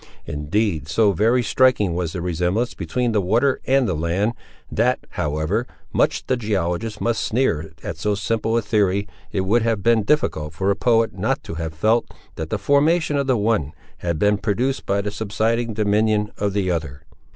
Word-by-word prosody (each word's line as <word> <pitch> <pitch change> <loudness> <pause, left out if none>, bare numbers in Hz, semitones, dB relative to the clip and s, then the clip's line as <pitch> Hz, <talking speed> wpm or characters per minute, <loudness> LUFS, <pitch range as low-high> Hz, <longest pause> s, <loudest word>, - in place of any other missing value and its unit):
Indeed 80 +3 -1
so 100 +6 +3
very 115 +7 +2
striking 125 -8 +3
was 85 -2 -2
the 85 - -4
resemblance 90 +7 0
between 125 -2 -1
the 105 -2 +2
water 120 +9 +1
and 135 -2 +3
the 95 - 0
land, 85 +8 0 0.4
that, - - +2
however 80 +10 -1 0.3
much - - +1
the 130 - +1
geologist 105 -1 -2
might 115 -1 +1
sneer 80 - 0
at 100 -6 -5
so 105 +4 0
simple 115 +3 0
a 115 - 0
theory, 100 -1 +1 0.2
it 95 - 0
would 105 +6 +2
have 110 -3 0
been 115 0 +4
difficult 85 - 0
for 95 +4 +1
a - - +1
poet 115 -2 +2
not 110 +9 -1
to - - -7
have 80 -1 -5
felt, 110 +8 +1 0.2
that 80 0 -5
the 110 - -1
formation 150 - +2
of 140 -1 0
the 130 -2 +3
one 105 -9 0 0.3
had 85 -2 -2
been 105 +4 +2
produced 120 +7 -1
by 100 0 +1
the 105 0 -3
subsiding 110 +2 -1
dominion 105 0 +1
of 100 -1 0
the 95 -3 0
other. 75 -5 -4
105 Hz, 185 wpm, -22 LUFS, 90-115 Hz, 0.4 s, been